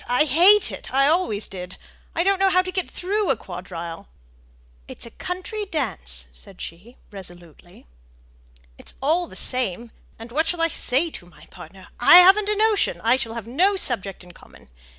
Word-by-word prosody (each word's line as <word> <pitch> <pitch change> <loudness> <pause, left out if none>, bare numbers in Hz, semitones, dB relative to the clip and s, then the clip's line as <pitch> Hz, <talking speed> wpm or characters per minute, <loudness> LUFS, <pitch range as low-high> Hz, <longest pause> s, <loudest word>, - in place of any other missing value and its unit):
I 250 +4 +3
hate 360 +9 +7
it; - - -8
I 275 +1 +3
always 300 - 0
did. 180 -1 -9 0.4
I 335 - +1
don't 390 0 +1
know 390 0 +3
how 370 0 +2
to 370 - -6
get 370 -1 -3
through 405 +2 -2
a 270 - +3
quadrille." 175 - -9 0.8
"It's - - -7
a 235 - -12
country 370 - -6
dance!" 60 - -2
said - - -13
she, 195 +10 -10
resolutely. 175 -3 -8 0.9
"It's - - -11
all 330 +6 0
the - - -14
same. 235 -3 -2 0.3
And 225 +1 -12
what 310 +6 0
shall 350 - -2
I 330 0 +1
say 295 +3 -1
to 175 - -11
my 175 - -18
partner? 190 -1 -14
I 245 - +7
haven't 385 +4 +7
a 425 - +1
notion: 430 -1 +1
I 230 +3 +3
shall 235 -3 -5
have 230 -3 -6
no 355 - +1
subject 200 - -2
in 180 - -14
common. - - -19
260 Hz, 180 wpm, -22 LUFS, -, 0.9 s, hate